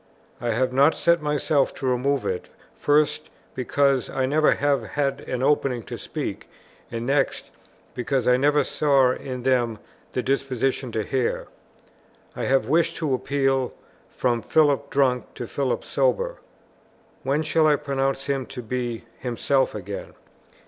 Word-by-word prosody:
I 120 - -1
have 125 +3 +1
not 140 +4 +5
set 170 -1 +3
myself 150 -1 +1
to 135 - -5
remove 130 +2 +1
it, 90 - -3 0.2
first, 150 +1 +1 0.2
because 135 0 +1
I 130 - 0
never 150 +3 +3
have 145 -1 +1
had 140 -1 -2
an 125 0 -2
opening 135 -4 +1
to - - -7
speak, - - -5 0.4
and, 115 0 -4
next, 135 +1 0 0.4
because 130 +1 -1
I 125 - +6
never 145 +3 +3
saw 135 -4 +3
in 125 -1 -5
them 120 -4 +1 0.4
the 125 - -1
disposition 135 -1 -1
to 110 - 0
hear. 130 +2 -1 0.9
I - - -3
have 135 0 +2
wished 160 +4 +2
to 155 -5 0
appeal 135 0 0 0.3
from 120 -2 0
Philip 145 -1 +2
drunk 130 -4 +1
to 120 - -5
Philip 130 +2 -1
sober. - - 0 0.8
When 140 +4 0
shall 155 0 +3
I 150 - +5
pronounce 135 -1 -1
him 135 -2 -1
to 125 -2 -7
be 120 0 -3 0.2
himself 130 +1 0
again? 100 -1 -6
135 Hz, 145 wpm, -24 LUFS, 125-145 Hz, 0.9 s, I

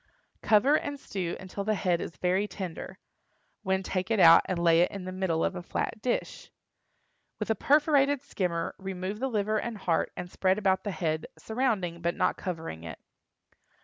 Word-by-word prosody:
Cover 225 +7 +4
and 285 -1 -5
stew 185 -9 -4
until 190 +1 -6
the 215 +1 +1
head 180 -3 0
is 155 - -7
very 185 +3 +1
tender, 185 -5 -7 0.6
when 190 -2 0
take 185 +1 -2
it 225 -3 +1
out 165 -2 +9
and 185 - -2
lay 170 -1 +4
it 175 - +3
in 195 -2 -7
the 185 - -4
middle 185 -3 0
of 190 - -2
a 180 - -4
flat 215 +5 -3
dish. 250 - -2 0.9
With - - -2
a - - +2
perforated 285 +1 +3
skimmer 180 -10 -2
remove 190 +1 -4
the 265 +2 -1
liver 215 -1 0
and 235 -1 -4
heart 175 -4 0
and 180 - -4
spread 185 +2 +1
about 190 -3 +1
the 205 - -3
head, 160 -5 -2
surrounding, 215 -8 -1
but 170 +1 0
not - - +1
covering 160 - -5
it. 80 -1 -7
190 Hz, 180 wpm, -28 LUFS, 175-215 Hz, 0.9 s, out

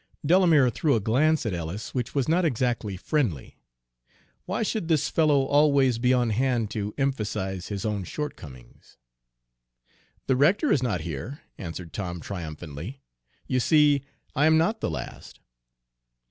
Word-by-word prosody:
Delamere 160 -6 +5
threw 145 +2 +1
a - - +2
glance 140 +9 +2
at 110 - -1
Ellis 85 +5 -5
which 125 0 -3
was 135 -3 +1
not 170 +3 +2
exactly 120 - -1
friendly. 100 - -2 0.9
Why - - -1
should 215 -5 -2
this 160 -4 +1
fellow 150 -4 +3
always 140 -4 +3
be 125 +1 +2
on 125 -3 +2
hand 120 -2 0
to 105 -1 -4
emphasize 105 -9 -2
his 100 -1 -4
own 105 -3 -2
shortcomings? 70 - -8 1.3
"The 130 - +2
rector 180 - +3
is 135 - +3
not 110 -9 -1
here," 85 - -6 0.2
answered 85 -1 -7
Tom 90 -4 -4
triumphantly. 85 - -7 0.5
"You 130 - 0
see 145 +1 +4 0.3
I 145 +2 +4
am 160 0 +5
not 195 +8 +1
the - - -1
last." - - -7
125 Hz, 145 wpm, -26 LUFS, 95-150 Hz, 1.3 s, Delamere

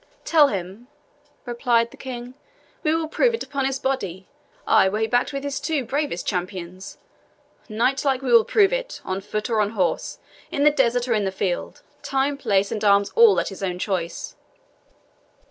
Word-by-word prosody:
"Tell 310 -3 +5
him," 195 +2 -5 0.6
replied 235 -1 +1
the - - -13
King, 250 -1 -7 0.5
"we 315 -2 +1
will 325 -1 -1
prove 470 +8 +2
it - - -5
upon 275 -2 -2
his 270 0 -1
body 195 -10 -3 0.4
ay, 190 - +4
were 205 - -2
he 220 - +1
backed 245 +2 +1
with 275 -1 -4
his 285 -1 -3
two 300 -6 -1
bravest 275 - -2
champions. 185 0 -5 0.7
Knightlike 260 +4 0
will 240 -3 +6
we 220 - -2
prove 410 +1 +3
it, - - -3
on 190 +1 -3
foot 210 +2 -3
or 225 -3 +1
on 210 +1 -1
horse, 180 -3 -1 0.3
in 285 - -1
the 300 - +6
desert 245 -3 +1
or 235 - +2
in 210 -2 +1
the 190 - -1
field, 190 -2 -3 0.2
time, 275 +1 0
place, 200 -7 +1
and 215 -1 -3
arms 200 -1 +4
all 455 -3 +6
at - - -2
his 195 - -10
own 180 -2 -2
choice." 180 -3 -3
240 Hz, 180 wpm, -23 LUFS, 195-275 Hz, 0.7 s, will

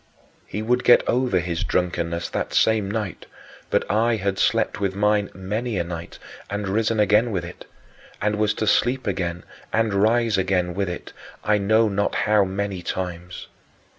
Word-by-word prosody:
He 105 - -4
would 125 +2 +1
get 120 - +5
over 125 -6 +2
his 85 -1 -1
drunkenness 85 -1 -1
that - - -3
same 110 -3 +3
night, 105 -3 -4 0.4
but - - +1
I 115 +2 +2
had 100 -2 -2
slept - - +1
with 95 -1 -1
mine 105 0 +2
many 105 +4 -3
a 85 - +1
night 85 -1 -7 0.3
and 100 0 -3
risen 110 +3 +1
again 105 +3 +4
with 90 -5 -2
it, 90 - -10 0.5
and 105 0 0
was 105 0 +1
to 110 - -1
sleep 125 +5 +2
again 90 -3 -2 0.3
and 110 -2 +1
rise 110 +1 +2
again 90 -2 0
with 100 0 -1
it, 90 - -7 0.3
I 105 0 +2
know 110 +3 +3
not 100 0 0
how 105 -1 +3
many 95 0 -3
times. 90 0 -5
100 Hz, 165 wpm, -23 LUFS, 90-110 Hz, 0.5 s, get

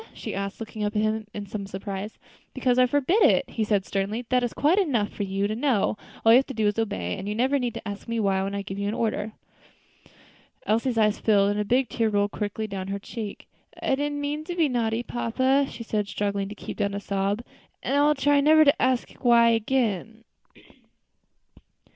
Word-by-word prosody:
she - - -6
asked, 200 0 -4
looking 220 -1 -5
up 210 +1 -2
at 210 - +2
him 215 0 -1
in 205 -1 -6
some 200 0 -6
surprise. 195 +1 -6 0.4
"Because 255 -1 +2
I 250 - +6
forbid 290 - +2
it," - - +4
he 225 - -3
replied 205 -3 +1
sternly; 205 +5 -2
"that 250 -1 +2
is 240 - -1
quite 320 +8 +2
enough 245 - +1
for - - -7
you 195 0 -1
to 215 - -3
know; 235 -5 +1 0.3
all 225 - +7
you 235 - +9
have 270 - -2
to 270 - -7
do 220 -1 0
is 205 - +3
to 225 - 0
obey, 90 - -3
and 195 - -5
you 210 - -2
need - - -5
never 265 +4 +2 0.3
ask 205 +1 -6
me 230 0 -1
why, 195 -2 +1
when 195 +1 -3
I 200 - -3
give 195 0 -6
you 200 - -1
an 210 - -2
order." 215 -1 -2 1.3
Elsie's 230 +3 +1
eyes 215 -1 +3
filled, 200 -2 +3
and 205 - -2
a - - +1
big 250 +5 +2
tear 225 -2 0
rolled 205 -1 +1
quickly 210 +1 -3
down 195 -3 -5
her 200 0 -2
cheek. 210 +1 -7 0.3
"I - - 0
did 290 +2 0
not 290 - -4
mean 295 +1 -2
to 350 - -4
be 330 -3 +3
naughty, 235 -2 -1
papa," 260 +4 +1
she 235 - -8
said, 210 -2 -2
struggling 200 0 -2
to 210 - -8
keep - - -8
down 200 -1 -1
a - - -2
sob, 200 +2 -1 0.4
"and 275 - 0
I 285 - +4
will 300 +1 +4
try 285 +1 +3
never 310 +2 +6
to 285 +3 +3
ask 255 -1 +2 0.2
why 235 -1 +6
again." 225 -2 0
220 Hz, 225 wpm, -25 LUFS, 205-255 Hz, 1.3 s, you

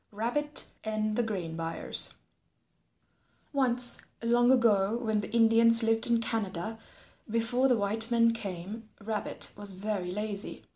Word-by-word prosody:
RABBIT 255 +8 -1
AND 215 -1 -2
THE 240 - +2
GRAIN 185 -8 -4
BUYERS 165 0 +1 1.4
Once 250 -3 0 0.2
long 240 +1 +3
ago 225 -4 +3
when 220 -3 -1
the 205 - -7
Indians 230 0 +5
lived 225 0 +2
in 235 -1 +3
Canada 220 -2 -3 0.5
before 230 +4 +1
the 250 -3 +3
white 220 +3 +2
men 230 -1 +3
came, 210 +1 -6
Rabbit 215 0 -2
was 205 -1 -5
very 190 -2 -3
lazy. 205 +1 -4
225 Hz, 130 wpm, -29 LUFS, 205-235 Hz, 1.4 s, Indians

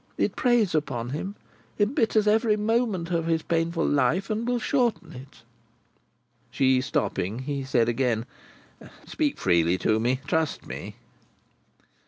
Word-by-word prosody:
It - - 0
preys 240 -6 +2
upon 130 -6 -2
him, 190 +8 -4 0.4
embitters 215 0 +2
every 215 0 +3
moment 210 -5 0
of 165 -1 0
his 165 -1 0
painful 165 0 0
life, 145 - +1
and 220 +2 -2
will 245 0 +1
shorten 235 - 0
it." 130 -1 -13 1.1
She 130 0 +2
stopping, 105 -5 -2
he 135 +1 -4
said 120 -3 +1
again: 120 -2 0 0.8
"Speak 295 -3 -1
freely 85 +1 +2
to 110 +3 +1
me. 125 +3 0
Trust 160 +1 -1
me." - - -7
160 Hz, 130 wpm, -26 LUFS, 130-215 Hz, 1.1 s, every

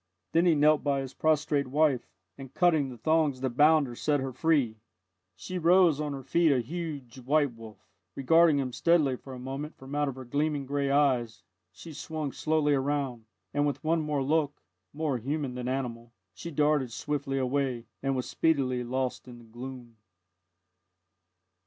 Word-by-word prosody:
Then 170 +2 +3
he 165 - +5
knelt 150 +1 +4
by 140 -2 +1
his 135 -1 -7
prostrate 150 -3 +1
wife, 140 -2 +1 0.3
and 135 -2 -10
cutting 160 -6 +3
the 125 - -9
thongs 155 -1 +1
that 130 -2 -1
bound 150 +4 +5
her, 120 - -7
set 145 +4 0
her 135 0 -3
free. 135 -6 +1 0.6
She 185 -1 -5
rose 170 -3 +4
on 150 -1 -2
her 135 -1 -7
feet 165 +4 +3
a 135 - +3
huge, 140 -2 -6
white 140 +1 +1
wolf. 110 -2 -13 0.3
Regarding 160 +2 +4
him 130 -3 -2
steadily 155 -5 +3
for 130 +1 -10
a - - -8
moment 135 +4 -6
from 135 +1 -10
out 145 0 +1
of 135 - -4
her 130 -1 -9
gleaming 145 +2 -1
grey 140 0 -1
eyes, 130 -5 +1 0.3
she 160 - -11
swung 155 -1 -4
slowly 155 -1 +1
round, 135 -4 -1 0.3
and 145 0 +2
with 145 - -3
one 160 +1 +1
more 150 -3 -1
look, 145 0 0 0.3
more 145 -4 -2
human 140 +2 -3
than 125 0 -5
animal, 120 -3 -4 0.2
she 170 - -8
darted 150 -4 +1
swiftly 140 +2 -3
away, 130 -2 -1 0.2
and 135 0 0
was 125 - -3
speedily 130 -6 +1
lost 130 +1 -3
in 120 -1 -10
the 120 - -15
gloom. 120 0 -9
140 Hz, 175 wpm, -28 LUFS, 130-155 Hz, 0.6 s, he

